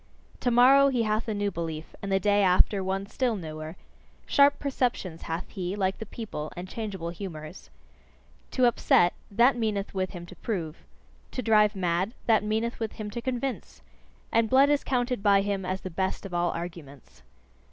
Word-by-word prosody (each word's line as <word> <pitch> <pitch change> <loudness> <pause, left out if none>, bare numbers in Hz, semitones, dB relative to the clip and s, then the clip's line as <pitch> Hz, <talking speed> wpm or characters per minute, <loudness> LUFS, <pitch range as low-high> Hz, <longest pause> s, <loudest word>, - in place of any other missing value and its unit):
Tomorrow 255 +3 +6
he 250 -4 +1
hath 215 +1 -1
a 220 - -1
new 205 0 -1
belief, 160 -2 -5
and 200 - -4
the 195 - +3
day 205 +1 +3
after, 190 +1 +3
one 190 +1 -2
still 240 +2 -1
newer. 155 -2 -7 0.5
Sharp 285 0 +5
perceptions 245 - -2
hath 165 +2 -4
he, 185 -1 -4
like 190 -2 -1
the 220 - -6
people, 195 -11 -6
and 180 +1 -5
changeable 190 -5 -5
humours. 170 -3 -8 0.8
To 255 - +2
upset 175 -6 +4 0.2
that 240 +6 +4
meaneth 215 -4 -2
with 185 -1 -1
him 175 -3 -8
to - - -12
prove. 170 -8 -4 0.6
To 255 - -3
drive 215 -2 +4
mad 185 +4 -1
that 220 -3 +4
meaneth 220 +3 -1
with 225 -2 -3
him 210 -1 -6
to 235 - -5
convince. 260 +1 -4 0.5
And 230 -1 +2
blood 275 +2 +5
is 290 - +2
counted 250 -3 -1
by 200 -1 +5
him 195 -1 -2
as 185 +1 -2
the 185 - -6
best 190 +4 -2
of 190 - -7
all 175 0 +1
arguments. 165 - -8
200 Hz, 175 wpm, -27 LUFS, 180-235 Hz, 0.8 s, Tomorrow